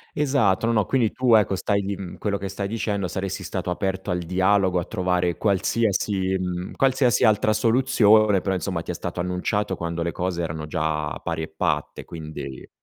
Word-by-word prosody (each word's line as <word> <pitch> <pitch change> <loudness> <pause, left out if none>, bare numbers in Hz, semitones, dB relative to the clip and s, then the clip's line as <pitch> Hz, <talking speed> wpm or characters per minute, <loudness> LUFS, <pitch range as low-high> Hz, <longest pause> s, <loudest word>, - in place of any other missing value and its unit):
Esatto, 130 -9 +2
no, 115 - +2
no. 105 -3 +2
Quindi 120 0 +1
tu 125 -3 +4
ecco 105 -2 +3
stai 100 +2 0
lì 100 0 -3
mhmm, 95 -2 -8
quello 100 -1 -1
che 100 0 -5
stai 100 +1 -3
dicendo 105 -3 -2
saresti 95 +1 -4
stato 95 -2 -4
aperto 95 +1 -2
al 90 - 0
dialogo 95 +2 +2
a 90 - 0
trovare 90 -3 -1
qualsiasi, 100 -1 +1
mhmm, 90 0 -4
qualsiasi 130 -2 +2
altra 110 0 +4
soluzione, 110 -3 +4
però 95 0 -1
insomma 90 -2 -2
ti - - -5
è - - -3
stato 85 +1 -4
annunciato 90 +2 -1
quando 85 0 -3
le 85 - -1
cose 90 0 -2
erano 80 -2 -4
già 75 -2 -2
pari 80 -1 -2
e - - -4
patte, - - -1
quindi 75 -5 -7
eh. - - -14
95 Hz, 190 wpm, -24 LUFS, 90-105 Hz, -, tu